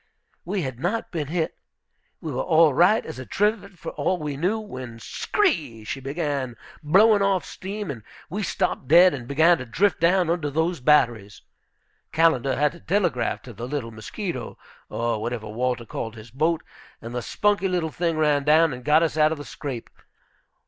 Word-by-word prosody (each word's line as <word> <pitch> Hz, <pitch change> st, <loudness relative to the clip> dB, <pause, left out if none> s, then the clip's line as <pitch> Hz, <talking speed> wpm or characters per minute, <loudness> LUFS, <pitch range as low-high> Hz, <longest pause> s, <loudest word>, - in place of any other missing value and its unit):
We 190 Hz, +1 st, -2 dB
had 130 Hz, -3 st, -5 dB
not 210 Hz, -, -2 dB
been 155 Hz, -5 st, -3 dB
hit. 160 Hz, +1 st, -2 dB, 0.6 s
We 160 Hz, -, -4 dB
were 130 Hz, -, -2 dB
all 160 Hz, -3 st, +4 dB
right 180 Hz, +10 st, +4 dB
as 160 Hz, -5 st, -7 dB
a 130 Hz, -, -7 dB
trivet 205 Hz, -2 st, -1 dB
for 165 Hz, -, -6 dB
all 185 Hz, -, 0 dB
we 150 Hz, -3 st, -4 dB
knew, 180 Hz, +10 st, 0 dB
when, 130 Hz, -, -8 dB
skree! 145 Hz, -, -1 dB
she 135 Hz, -, -4 dB
began 140 Hz, -3 st, -3 dB, 0.3 s
blowing 200 Hz, +7 st, +5 dB
off 195 Hz, -3 st, +1 dB
steam, 200 Hz, -2 st, -5 dB
and 120 Hz, -5 st, -8 dB, 0.3 s
we 205 Hz, +5 st, -4 dB
stopped 165 Hz, -7 st, -1 dB
dead, 175 Hz, +5 st, +7 dB
and 125 Hz, -4 st, -6 dB
began 160 Hz, +5 st, +4 dB
to 130 Hz, -, -6 dB
drift 195 Hz, -, +1 dB
down 175 Hz, +1 st, +3 dB
under 165 Hz, -4 st, -1 dB
those 160 Hz, +3 st, 0 dB
batteries. 120 Hz, -7 st, +2 dB, 0.7 s
Callender 140 Hz, -5 st, +3 dB
had 150 Hz, 0 st, +2 dB
to 170 Hz, -, -14 dB
telegraph 165 Hz, -, 0 dB
to 120 Hz, -, -10 dB
the 115 Hz, +4 st, -6 dB
little 130 Hz, -4 st, -4 dB
Mosquito, 125 Hz, -, -6 dB, 0.3 s
or 115 Hz, -2 st, -1 dB
whatever 115 Hz, -1 st, -4 dB
Walter 120 Hz, +2 st, -2 dB
called 115 Hz, +1 st, -5 dB
his 110 Hz, +1 st, -12 dB
boat, 160 Hz, +3 st, 0 dB, 0.4 s
and 115 Hz, +1 st, -8 dB
the 125 Hz, -, -2 dB
spunky 205 Hz, -, +1 dB
little 175 Hz, -4 st, -1 dB
thing 165 Hz, 0 st, -1 dB
ran 150 Hz, -2 st, +2 dB
down 155 Hz, +1 st, +4 dB
and 125 Hz, 0 st, -8 dB
got 155 Hz, +3 st, +4 dB
us 160 Hz, -2 st, -1 dB
out 155 Hz, 0 st, +4 dB
of 160 Hz, -, -2 dB
the 145 Hz, -, -8 dB
scrape. 130 Hz, -6 st, -6 dB
155 Hz, 185 wpm, -24 LUFS, 125-175 Hz, 0.7 s, dead